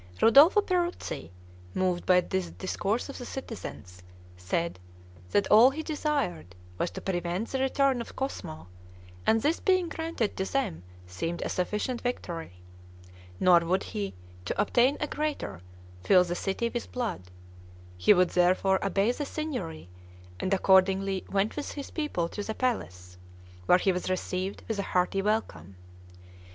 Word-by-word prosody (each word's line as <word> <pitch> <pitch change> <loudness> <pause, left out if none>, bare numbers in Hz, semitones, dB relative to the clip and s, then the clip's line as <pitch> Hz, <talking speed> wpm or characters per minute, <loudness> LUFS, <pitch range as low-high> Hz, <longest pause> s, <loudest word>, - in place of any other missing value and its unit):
Ridolfo 290 - +7
Peruzzi, 355 - -2 0.5
moved 180 -2 0
by 180 -1 +6
the 190 - -1
discourse 200 +5 -2
of 275 - -8
the 245 - -6
citizens, 100 - -8 0.3
said, 95 - -2 0.5
that 205 - +2
all 225 +5 +9
he 310 +4 -5
desired 285 - -2 0.2
was 175 - 0
to - - -8
prevent 180 +3 -2
the 265 - -2
return 265 -1 +2
of - - -9
Cosmo, 85 - -5 0.6
and 225 - +5
this 315 +3 +2
being 370 -3 +2
granted 320 -10 -2
to 190 - -2
them 275 - -1 0.2
seemed 165 - -4
a - - -3
sufficient 210 +7 -2
victory; 170 - -4 0.9
nor 180 -2 +6
would 175 +3 0
he, 100 -2 -4 0.3
to - - -3
obtain 245 +6 +3
a - - 0
greater, 295 - -3 0.4
fill 185 -2 +6
the 175 -1 -3
city 195 +6 -1
with 240 0 -5
blood; 225 - -4 0.7
he 90 - +4
would 180 -3 +5
therefore 185 +2 +3
obey 195 +3 +2
the 290 - -4
Signory; 265 - -5 0.5
and 185 - -2
accordingly 190 0 +3
went 200 +2 0
with 295 - -4
his 285 -2 -7
people 295 - -1
to 205 - -6
the 220 +1 -4
palace, 90 - -3 0.5
where 180 - +7
he 190 +1 +2
was 180 0 -3
received 185 +1 -3
with 220 -3 -2
a 200 - -4
hearty 180 +2 +2
welcome. 145 - -2
195 Hz, 150 wpm, -28 LUFS, 175-255 Hz, 0.9 s, all